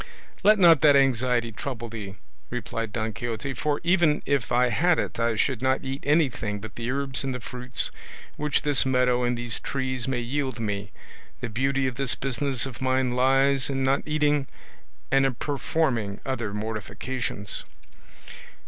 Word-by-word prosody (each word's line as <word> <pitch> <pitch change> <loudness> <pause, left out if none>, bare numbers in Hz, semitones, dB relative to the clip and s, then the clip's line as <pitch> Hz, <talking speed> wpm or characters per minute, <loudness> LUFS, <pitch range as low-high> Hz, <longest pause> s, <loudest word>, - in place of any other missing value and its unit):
"Let 215 +1 +6
not 170 -6 +7
that 145 -2 +7
anxiety 125 -3 +2
trouble 120 +1 -5
thee," 105 -4 -7 0.3
replied 115 -2 -4
Don 110 0 -2
Quixote, 120 +4 -4
"for 145 +5 -1
even 170 -4 +3
if 140 -4 0
I 125 +1 +4
had 175 +6 +3
it - - -3
I 115 -1 +1
should 125 +2 0
not 130 0 +1
eat 135 +1 -4
anything 130 -9 +1
but 110 +1 -9
the 115 +1 -4
herbs 135 0 -1
and 135 -1 -2
the - - -4
fruits 125 +1 -2 0.4
which 150 -1 0
this 145 -2 +3
meadow 125 -1 +2
and 120 0 +1
these 120 -2 -1
trees 130 -2 -3
may 130 -2 0
yield 130 0 -2
me; 100 -2 -3 0.5
the 125 - -4
beauty 135 +4 0
of 130 -2 -2
this 135 -2 +1
business 135 -1 -1
of 130 -4 -8
mine 130 -1 +1
lies 135 +2 +3
in 135 -1 -1
not 135 +1 +2
eating, 150 -2 +1 0.6
and 135 0 +4
in 135 -2 +1
performing 130 -7 -1
other 120 -6 -2
mortifications." 105 0 -4
130 Hz, 165 wpm, -26 LUFS, 115-140 Hz, 0.6 s, not